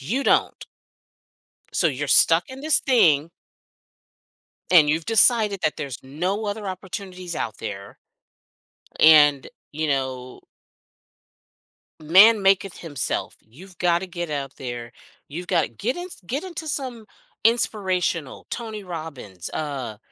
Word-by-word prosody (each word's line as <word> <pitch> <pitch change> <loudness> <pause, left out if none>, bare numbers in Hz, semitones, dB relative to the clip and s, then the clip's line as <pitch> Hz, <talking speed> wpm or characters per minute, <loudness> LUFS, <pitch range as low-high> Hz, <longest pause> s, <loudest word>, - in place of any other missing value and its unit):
You 235 - -2
don't. - - +1 1.1
So 175 - +2
you're 145 -1 -2
stuck 165 +4 +4
in 260 +1 -9
this 310 +1 +2
thing 165 - +3 1.4
and 155 -5 +7
you've 160 +1 0
decided 220 -3 +3
that 155 - +1
there's 135 -3 -5
no 180 +10 -3
other 205 0 -4
opportunities 185 -1 -7
out 110 - -4
there 100 -2 -7 1.0
and, 145 -3 +6 0.3
you 155 +1 -2
know 130 -3 -3 1.6
man 200 +7 +7
maketh 195 -1 +2
himself. 145 -6 -4
You've 175 - -15
gotta 175 +1 +1
get 175 -2 -6
out 140 -2 -4
there. 120 -2 -6 0.4
You've 175 +5 -7
gotta 175 -3 +1
get 220 - -3
in 355 - -6 0.2
get 275 - -3
into 340 -3 -7
some 255 -6 -4 0.4
inspirational 185 - 0
Tony 220 -3 -5
Robbins. 150 - -8
Uh, 135 -8 -4
170 Hz, 120 wpm, -23 LUFS, 140-205 Hz, 1.6 s, and